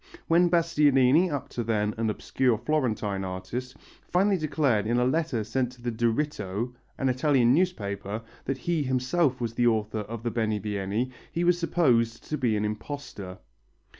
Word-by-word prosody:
When 175 +1 +4
Bastianini, 155 -2 +4
up 140 -3 -3
to 120 - -3
then 105 -2 0
an 115 0 -1
obscure 120 +2 0
Florentine 110 -9 -1
artist, 95 +8 -5 0.3
finally 195 +3 +3
declared 140 - +1
in 120 +2 +1
a 125 - +3
letter 140 -4 0
sent 125 +3 -1
to 125 - -17
the 120 - -1
Diritto, 115 -2 -1 0.2
an 135 - 0
Italian 130 -1 +3
newspaper, 110 - -1 0.2
that 135 0 -1
he 165 +4 -1
himself 130 +2 +1
was 115 -2 -2
the 120 +1 +2
author 110 -1 0
of 110 +2 -6
the 120 - -1
Benivieni, 105 +1 -1 0.2
he 170 - -1
was 175 0 +3
supposed 120 -10 +2
to 150 - -1
be 115 -5 +1
an 105 - 0
imposter. 105 -4 -6
125 Hz, 160 wpm, -27 LUFS, 110-150 Hz, 0.3 s, When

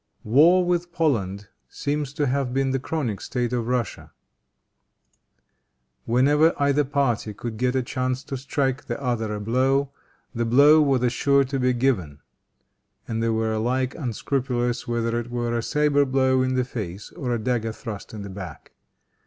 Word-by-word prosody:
War 165 +11 +5
with 175 0 0
Poland 105 - -1 0.2
seems 145 -1 -3
to 145 0 0
have 130 -1 -1
been 135 0 +1
the 135 - 0
chronic 125 - -3
state 125 -1 -2
of 120 -2 -1
Russia. 125 -3 -2 1.9
Whenever 145 +7 +3
either 140 +1 +3
party 130 -6 -1
could 115 +1 -5
get 125 +2 0
a 130 - +1
chance 130 +1 -2
to 135 - -5
strike 135 0 -2
the - - -4
other 120 -5 -1
a - - -4
blow, 130 +5 +1 0.4
the 120 -1 -1
blow 140 +7 +6
was 130 -4 +2
sure 140 +2 +3
to 135 +1 -3
be 125 0 +2
given; 115 - 0 0.9
and 115 -1 -2
they 115 - +1
were 110 0 0
alike 125 +4 0
unscrupulous 125 -2 -2
whether 115 0 0
it 120 0 -6
were 120 -1 -2
a 115 - 0
saber 145 +2 +2
blow 130 -1 +2
in 130 0 0
the 125 -1 +1
face 105 -6 -6
or 135 -8 -4
a 120 - +1
dagger 115 -1 -1
thrust 110 -2 -8
in 105 -2 -7
the 100 - -7
back. 95 -6 -9
125 Hz, 165 wpm, -24 LUFS, 115-140 Hz, 1.9 s, blow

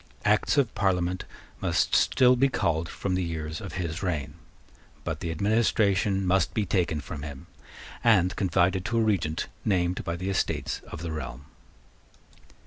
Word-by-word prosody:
Acts 105 +7 +3
of 130 -6 +2
Parliament 90 -2 0 0.4
must - - +1
still 125 0 +5
be 135 +2 +3
called 85 -8 0
from 95 - -3
the 90 - +1
years 80 -2 -4
of - - -7
his 85 -2 -3
reign. 75 -6 -2 0.7
But - - -3
the 85 - -4
administration 100 +1 +2
must 90 -1 +2
be 105 - +1
taken 85 -5 0
from 75 +1 -7
him 70 -2 -8 0.6
and 95 -5 +4
confided 95 0 +2
to 115 +1 0
a - - +4
Regent 85 -8 0 0.2
named 90 -3 +1
by 85 -2 -2
the 90 +3 -3
Estates 95 - -1
of 80 - -7
the 85 - -3
Realm. 70 -3 -6
90 Hz, 155 wpm, -27 LUFS, 80-100 Hz, 0.7 s, still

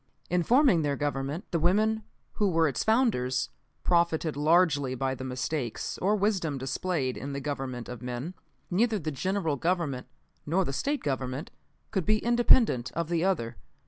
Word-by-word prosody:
"In 180 0 +3
forming 245 - +4
their 145 -2 0
Government, 145 +3 -2
the 170 - +1
women, 215 +6 +2 0.3
who 205 -3 +1
were 165 -2 +3
its 135 - -1
founders, 220 - +2 0.3
profited 170 -3 +2
largely 150 -3 +3
by 130 +1 -1
the 130 - -7
mistakes 130 -1 -3
or 205 +3 +2
wisdom 190 -8 0
displayed 135 0 -2
in 140 +1 -5
the 140 - -3
Government 135 -4 -4
of 125 -1 -7
men. 125 +7 -4 0.4
Neither 220 +4 +2
the 155 -4 -3
General 165 +1 -1
Government, 165 -5 -1 0.4
nor 175 +5 +1
the 135 - -3
State 285 - -1
Government, 130 +1 -3 0.4
could 190 -5 -1
be 215 0 +4
independent 235 - +3
of 170 0 -2
the 170 -1 +1
other. 170 -12 0
160 Hz, 160 wpm, -28 LUFS, 135-190 Hz, 0.4 s, forming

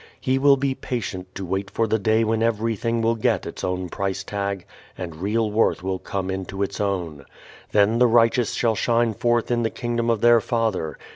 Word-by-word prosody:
He 130 +1 0
will 140 0 +5
be 135 0 0
patient 95 -8 -5
to 95 - -5
wait 95 +2 -2
for 115 +3 0
the 110 0 0
day 110 +2 +2
when 110 0 0
everything 115 0 0
will 115 +1 +3
get 115 - 0
its - - -7
own 90 0 -2
price 95 +1 -3
tag 100 -2 -3 0.3
and 85 -4 -6
real 105 +4 0
worth 105 -4 +1
will 95 0 -2
come 95 0 -3
into 95 +1 -3
its 100 - -3
own. 90 -8 -2 0.5
Then 105 +3 +3
the 125 - +6
righteous 115 +1 +3
shall 115 -2 +2
shine 115 +2 +1
forth 120 +3 0
in 120 0 +2
the 115 - +1
Kingdom 120 0 -2
of 115 -2 +1
their 120 -1 +6
Father. 110 -10 -1
110 Hz, 200 wpm, -23 LUFS, 95-115 Hz, 0.5 s, the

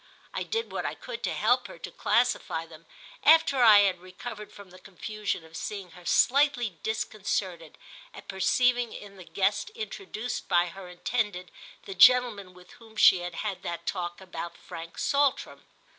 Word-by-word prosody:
I - - -3
did 455 +1 -3
what - - -3
I - - -3
could - - -8
to - - -1
help - - +2
her - - -11
to - - -8
classify 235 -9 0
them, 160 0 -16 0.4
after 310 -4 +5
I 215 -4 +8
had 190 -3 +1
recovered 210 +4 -9
from 200 -3 -14
the 185 - -14
confusion 200 0 -5
of 160 0 -15
seeing 195 -2 -6
her 175 +1 -15
slightly 245 - +2
disconcerted 200 -6 -3 0.3
at 430 - -13
perceiving 240 +5 +1
in 200 -1 -11
the 185 - -10
guest 200 - -1
introduced 395 - -5
by 175 -1 +2
her 185 +1 -10
intended 180 0 -3 0.3
the 195 - -6
gentleman 210 -3 +5
with 180 0 -17
whom 225 -1 -17
she 190 -3 +6
had 175 -1 -6
had 200 -3 -3
that 170 0 -5
talk 175 -1 -3
about 175 -2 -7
Frank 165 0 -10
Saltram. 285 -1 0
200 Hz, 165 wpm, -27 LUFS, 180-245 Hz, 0.4 s, I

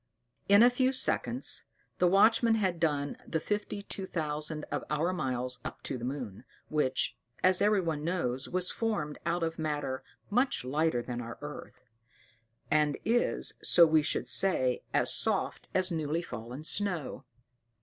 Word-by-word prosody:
In 200 +3 +8
a 245 - +7
few 255 +1 +2
seconds 260 - +2 0.3
the 180 - +4
watchman 225 +4 +5
had 190 -6 0
done 145 -3 0
the 160 - -1
fifty 205 +2 -3
two 195 -1 -5
thousand 150 -2 -3
of - - -2
our 160 +4 0
miles 125 -5 -3
up - - -7
to - - -3
the 120 - -7
moon, 125 -5 -5 0.3
which, 135 -4 +1 0.3
as 185 0 +4
everyone 185 -8 +1
knows, 135 -7 -2
was 180 0 -1
formed 200 -11 -2
out 170 0 0
of 165 0 -3
matter 145 -4 -2 0.3
much 250 - +1
lighter 145 -2 0
than 120 -1 -4
our 115 -1 -7
earth; - - -9 0.9
and 150 -2 +2
is, 240 +2 +1
so 170 - +6
we 160 -1 +4
should 150 - -1
say, 130 -10 +2
as - - +2
soft - - 0
as 185 0 +1
newly 160 +1 -1
fallen 120 +1 -7
snow. 180 -4 -2
160 Hz, 150 wpm, -30 LUFS, 140-190 Hz, 0.9 s, In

